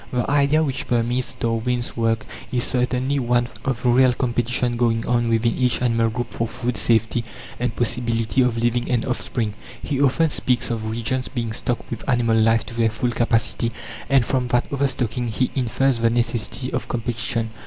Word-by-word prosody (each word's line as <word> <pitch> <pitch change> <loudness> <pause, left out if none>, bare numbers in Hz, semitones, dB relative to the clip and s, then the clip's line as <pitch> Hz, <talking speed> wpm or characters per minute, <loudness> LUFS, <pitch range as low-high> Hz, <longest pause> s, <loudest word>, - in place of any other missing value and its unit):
The 125 -1 -1
idea 145 +2 +3
which 140 0 -3
permeates 120 +1 0
Darwin's 120 +1 -1
work 115 -1 0 0.3
is 125 -1 0
certainly 130 +3 0
one 120 -1 +1
of 130 -3 -2
real 125 +1 +5
competition 120 0 0
going 115 -1 +1
on 120 -1 +1
within 115 0 +2
each 125 -2 +1
animal 115 -2 +2
group 120 +2 -4
for 115 - -1
food, 120 +1 -3
safety, 115 +2 +2 0.4
and 120 -2 -1
possibility 115 0 +1
of 125 -2 +1
leaving 120 +1 0
an 120 -3 +1
offspring. 120 -4 -2 0.3
He 140 -2 -2
often 145 +3 +3
speaks 125 -3 0
of 110 -1 -3
regions 120 +3 -2
being 115 -4 -3
stocked 120 +2 -2
with 120 +3 -5
animal 120 -3 +2
life 115 +1 +3
to 120 - -8
their 115 -1 +2
full 120 +3 -1
capacity, 115 0 +1 0.4
and 135 -3 +4
from 125 0 0
that 120 0 +1
overstocking 125 -4 0
he 125 +3 -1
infers 130 0 +1
the 115 0 +3
necessity 120 +2 -1
of - - -2
competition. 115 -1 -2
120 Hz, 175 wpm, -22 LUFS, 115-125 Hz, 0.4 s, real